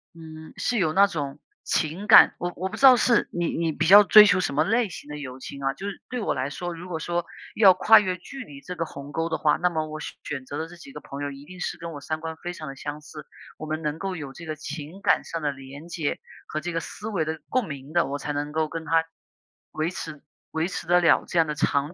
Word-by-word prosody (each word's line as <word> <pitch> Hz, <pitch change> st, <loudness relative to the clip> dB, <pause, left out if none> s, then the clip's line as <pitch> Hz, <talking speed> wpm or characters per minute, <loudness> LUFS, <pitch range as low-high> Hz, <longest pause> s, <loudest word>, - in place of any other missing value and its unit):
嗯 160 Hz, -1 st, -11 dB
是 245 Hz, -, 0 dB
有 160 Hz, -4 st, +2 dB
那 200 Hz, +3 st, +6 dB
种 145 Hz, -6 st, -5 dB, 0.2 s
情 170 Hz, +6 st, -1 dB
感， 215 Hz, -, +8 dB
我 175 Hz, -, -2 dB
我 185 Hz, +2 st, -3 dB
不 215 Hz, -, -7 dB
知 225 Hz, -, -9 dB
道 260 Hz, -2 st, +10 dB
是 235 Hz, 0 st, +3 dB
你 175 Hz, -1 st, -1 dB
你 165 Hz, -1 st, 0 dB
比 155 Hz, -, -1 dB
较 205 Hz, +3 st, +10 dB
追 210 Hz, +2 st, +9 dB
求 185 Hz, -2 st, +4 dB
什 145 Hz, -, -1 dB
么 150 Hz, -, +3 dB
类 225 Hz, +2 st, +1 dB
型 160 Hz, -, -10 dB
的 150 Hz, -, -6 dB
友 130 Hz, -3 st, -8 dB
情 140 Hz, +1 st, -8 dB
啊， 135 Hz, 0 st, +1 dB
就 200 Hz, -, -7 dB
是 200 Hz, -, -7 dB
对 250 Hz, -, -3 dB
我 215 Hz, -, 0 dB
来 130 Hz, +1 st, -2 dB
说， 175 Hz, +4 st, -5 dB
如 175 Hz, +2 st, -9 dB
果 160 Hz, -2 st, -3 dB
说 175 Hz, +1 st, -2 dB, 0.3 s
要 195 Hz, -4 st, +7 dB
跨 220 Hz, +4 st, +7 dB
越 185 Hz, -2 st, -2 dB
距 265 Hz, +8 st, -9 dB
离 140 Hz, -7 st, -12 dB
这 180 Hz, -, -7 dB
个 165 Hz, -, -2 dB
鸿 140 Hz, -1 st, -9 dB
沟 165 Hz, +1 st, -1 dB
的 160 Hz, -, -1 dB
话， 150 Hz, -1 st, +3 dB
那 180 Hz, -, +2 dB
么 155 Hz, -2 st, -2 dB
我 155 Hz, 0 st, -6 dB
选 -, -, -7 dB
选 135 Hz, -3 st, -5 dB
择 145 Hz, -, -6 dB
的 160 Hz, +1 st, -3 dB
这 175 Hz, -, -13 dB
几 275 Hz, +11 st, -13 dB
个 -, -, -8 dB
朋 140 Hz, +1 st, -7 dB
友 140 Hz, -, -3 dB
一 140 Hz, +1 st, -11 dB
定 185 Hz, +3 st, -12 dB
是 -, -, -3 dB
跟 170 Hz, -1 st, -7 dB
我 145 Hz, -, -8 dB
三 155 Hz, +2 st, -3 dB
观 160 Hz, 0 st, -5 dB
非 175 Hz, -, -3 dB
常 155 Hz, -3 st, -8 dB
地 135 Hz, -, -7 dB
相 145 Hz, +2 st, -6 dB
似， 150 Hz, 0 st, -11 dB, 0.3 s
我 155 Hz, -, -7 dB
们 155 Hz, +1 st, -3 dB
能 150 Hz, 0 st, -2 dB
够 190 Hz, 0 st, -4 dB
有 140 Hz, -3 st, -7 dB
这 170 Hz, -, -10 dB
个 155 Hz, -1 st, -4 dB
情 150 Hz, +4 st, -7 dB
感 -, -, +3 dB
上 165 Hz, -1 st, -5 dB
的 145 Hz, -, 0 dB
连 135 Hz, +4 st, -11 dB
接 165 Hz, -4 st, -3 dB, 0.3 s
和 155 Hz, -, -3 dB
这 175 Hz, +1 st, -5 dB
个 165 Hz, -, 0 dB
思 210 Hz, -, -8 dB
维 195 Hz, -7 st, 0 dB
的 160 Hz, 0 st, -4 dB
共 255 Hz, -3 st, +1 dB
鸣 140 Hz, +1 st, -8 dB
的， 175 Hz, -, +3 dB
我 140 Hz, +1 st, -3 dB
才 150 Hz, -, -4 dB
能 145 Hz, +1 st, -3 dB
够 155 Hz, 0 st, 0 dB
跟 165 Hz, +1 st, -6 dB
他 165 Hz, 0 st, +2 dB, 0.7 s
维 155 Hz, +2 st, -1 dB
持 160 Hz, -4 st, -7 dB, 0.3 s
维 160 Hz, +2 st, -1 dB
持 185 Hz, -, -5 dB
得 175 Hz, +1 st, +4 dB
了 170 Hz, -, +4 dB
这 175 Hz, -, 0 dB
样 160 Hz, -, +4 dB
的 150 Hz, -, -3 dB
长 145 Hz, +2 st, 0 dB
160 Hz, 300 characters per minute, -25 LUFS, 150-180 Hz, 0.7 s, 道